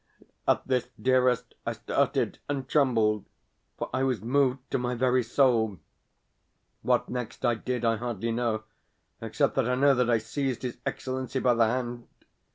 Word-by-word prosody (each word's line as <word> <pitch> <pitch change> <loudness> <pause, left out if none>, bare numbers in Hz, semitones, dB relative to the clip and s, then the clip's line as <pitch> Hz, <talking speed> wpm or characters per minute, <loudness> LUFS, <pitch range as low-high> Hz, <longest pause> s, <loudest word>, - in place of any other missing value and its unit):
At - - +2
this, 125 -2 +1
dearest, 125 -1 +2
I - - -2
started - - 0
and 135 -2 -2
trembled, 115 -8 +2 0.5
for - - -3
I 130 - 0
was 130 -4 +1
moved 130 +4 +2
to - - +1
my 125 0 -1
very 130 +1 +2
soul. 115 -4 +2 1.0
What - - +1
next 125 0 -4
I 120 - +4
did 120 +1 -3
I 115 -1 +2
hardly 115 -1 -3
know, 115 -2 -1 0.6
except 115 +6 0
that 130 -2 +2
I 125 - +2
know 140 +2 +5
that 125 -2 +1
I 115 - +4
seized 125 +3 -3
his 125 -2 -4
Excellency 130 0 -3
by 125 -1 +3
the 115 -1 +4
hand. 120 0 -3
125 Hz, 165 wpm, -28 LUFS, 115-130 Hz, 1.0 s, know